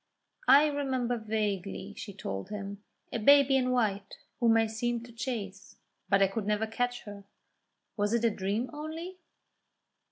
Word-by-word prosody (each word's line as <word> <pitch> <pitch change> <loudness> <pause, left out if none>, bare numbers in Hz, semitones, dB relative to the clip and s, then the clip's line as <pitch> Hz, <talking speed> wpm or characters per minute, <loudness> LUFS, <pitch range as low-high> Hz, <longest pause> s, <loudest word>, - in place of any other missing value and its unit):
"I 285 +2 +8
remember 265 -5 0
vaguely," 205 -3 -3
she 205 - -7
told 95 - -5
him, 200 -1 -6 0.3
"a 235 - -1
baby 280 +3 +6
in 255 -1 +2
white 215 -6 0 0.2
whom 230 -2 +4
I 225 - +4
seemed 235 +2 -2
to 240 - -13
chase, 215 -5 -5 0.3
but 195 -1 +5
I - - +5
could 200 +1 -4
never 210 +1 +1
catch 245 +2 -2
her. 205 -2 -9 0.7
Was 205 0 +1
it 235 0 +1
a 230 - +4
dream 205 +5 -2
only?" 325 +5 -6
225 Hz, 155 wpm, -30 LUFS, 205-250 Hz, 0.7 s, I